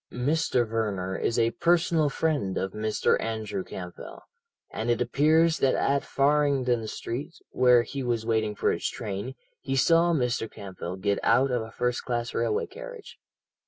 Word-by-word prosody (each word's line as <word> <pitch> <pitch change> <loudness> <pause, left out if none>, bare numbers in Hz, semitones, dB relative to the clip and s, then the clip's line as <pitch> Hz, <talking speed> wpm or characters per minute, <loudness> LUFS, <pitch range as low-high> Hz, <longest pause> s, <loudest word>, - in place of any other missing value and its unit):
"Mr. 125 -2 +1
Verner 100 -4 -2
is 115 - -1
a 115 0 +3
personal 165 0 +2
friend 145 -11 -1
of 95 - -2
Mr. 105 0 +1
Andrew 110 -4 -3
Campbell, 90 -2 -9 0.5
and 115 +2 -3
it 120 - +2
appears 155 +7 +3
that 130 - +3
at 140 0 +1
Farringdon 135 -5 +1
Street, 140 +10 -5 0.2
where 125 -2 +5
he 140 +3 -5
was 120 -3 -1
waiting 110 -2 0
for - - +1
his - - -2
train, 115 +1 -5 0.2
he 135 - -3
saw 165 +5 +4
Mr. 125 -7 0
Campbell 95 -2 -7
get 100 +1 0
out 130 +4 +3
of 125 -2 0
a 110 - -7
first 125 +1 -1
class 120 -1 -2
railway 115 -2 0
carriage. - - -10
120 Hz, 160 wpm, -27 LUFS, 110-145 Hz, 0.5 s, where